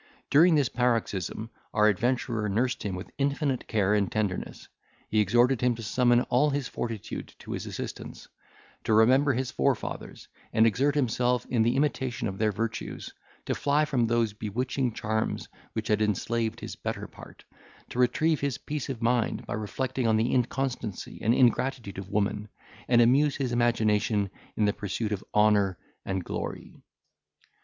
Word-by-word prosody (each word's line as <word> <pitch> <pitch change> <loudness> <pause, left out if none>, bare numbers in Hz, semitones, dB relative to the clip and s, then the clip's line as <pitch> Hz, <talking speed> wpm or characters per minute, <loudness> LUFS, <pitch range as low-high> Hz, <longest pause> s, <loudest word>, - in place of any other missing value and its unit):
During 165 +4 +6
this 145 -4 +3
paroxysm, 115 -3 -1 0.2
our 105 0 +5
adventurer 115 +1 0
nursed 120 +5 0
him 100 -3 -3
with 90 - -8
infinite 140 -1 0
care 105 -2 +2
and 100 -2 +1
tenderness, 105 -4 -3 0.4
he 110 - +1
exhorted 120 +5 +3
him 125 -1 +2
to 115 - -8
summon 120 +3 +3
all 130 +5 +2
his 140 -2 -1
fortitude 115 -4 -5
to - - -10
his - - -4
assistance, - - -7 0.6
to 110 - +3
remember 130 +6 +5
his 130 +1 -2
forefathers, 135 -3 -2 0.3
and 110 - +5
exert 135 +6 +2
himself 125 -2 +1
in 120 -3 +3
the 120 +3 +2
imitation 130 -5 0
of 95 -1 -5
their 110 -1 +2
virtues, 115 +2 -4 0.3
to - - 0
fly 145 +2 +2
from 125 -6 +1
those 115 -2 +1
bewitching 125 +5 -2
charms 110 0 -2 0.3
which 110 0 -3
had 105 0 +2
enslaved 110 +2 -1
his - - -6
better - - -4
part, - - -14 0.5
to 125 - -5
retrieve 155 +6 +2
his 140 -2 -1
peace 150 -2 -5
of 120 -4 -4
mind 120 0 +1
by - - -4
reflecting 125 +4 -2
on 110 -1 +3
the 115 +3 +1
inconstancy 125 -4 -2
and 115 +3 +3
ingratitude 120 -5 +1
of 95 0 -8
woman, 105 0 -1 0.4
and 120 -1 +5
amuse 140 +4 +4
his 130 -3 -2
imagination 110 -4 +1 0.3
in 105 - +3
the 105 - +2
pursuit 105 +2 -3
of 105 -1 -2
honour 105 -3 +4 0.3
and 95 -1 -2
glory. - - -5
115 Hz, 160 wpm, -28 LUFS, 105-130 Hz, 0.6 s, During